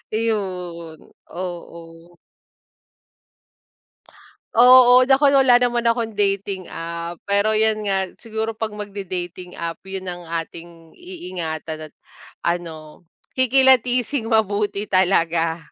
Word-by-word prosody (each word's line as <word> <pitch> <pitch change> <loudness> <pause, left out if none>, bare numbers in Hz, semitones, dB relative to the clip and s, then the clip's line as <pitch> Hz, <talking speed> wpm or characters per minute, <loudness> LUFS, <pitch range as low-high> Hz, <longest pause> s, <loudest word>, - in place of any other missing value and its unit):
Iyon, 180 -7 -3 0.3
oo. 170 -1 -9 2.4
Oo, 250 +1 +7
naku, 275 +1 +4
wala 265 -3 +6
naman 245 -1 0
akong 230 -1 0
dating 195 -2 -2
app. 170 +1 -6
Pero 205 +2 +2
yun 215 -1 +1
nga 190 -1 +1 0.2
siguro 220 0 -4
'pag 220 0 -4
magde-dating 185 -4 -7
app 165 -1 -5
yun 190 0 -7
ang 175 -2 -7
ating 165 0 -7
iingatan 165 - -7
at - - -37 0.5
ano 165 -3 -4 0.3
kikilatising 255 -1 +2
mabuti 210 -2 0
talaga, 170 -4 +1
195 Hz, 95 wpm, -21 LUFS, 170-225 Hz, 2.4 s, Oo